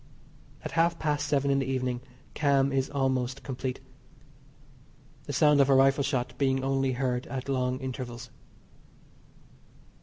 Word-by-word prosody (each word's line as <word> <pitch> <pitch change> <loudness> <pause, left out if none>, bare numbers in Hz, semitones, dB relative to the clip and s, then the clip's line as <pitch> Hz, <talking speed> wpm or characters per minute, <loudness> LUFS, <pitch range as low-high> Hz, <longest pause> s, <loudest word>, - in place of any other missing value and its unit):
At - - -4
half 165 +1 +2
past 150 -2 -1
seven 140 -1 +1
in 140 - +2
the 135 - -2
evening 130 -2 -2 0.3
calm 140 -2 +2
is 135 -1 0
almost 130 -1 -1
complete. 130 -1 -4 1.5
The - - -5
sound 145 0 +5
of 140 - +3
a 135 - +6
rifle 135 +1 +4
shot 125 -3 -2
being 135 -1 +1
only 135 -1 +1
heard 125 -1 -2
at 130 -1 -5
long 130 -2 0
intervals. 125 -2 -6
135 Hz, 140 wpm, -28 LUFS, 130-140 Hz, 1.5 s, a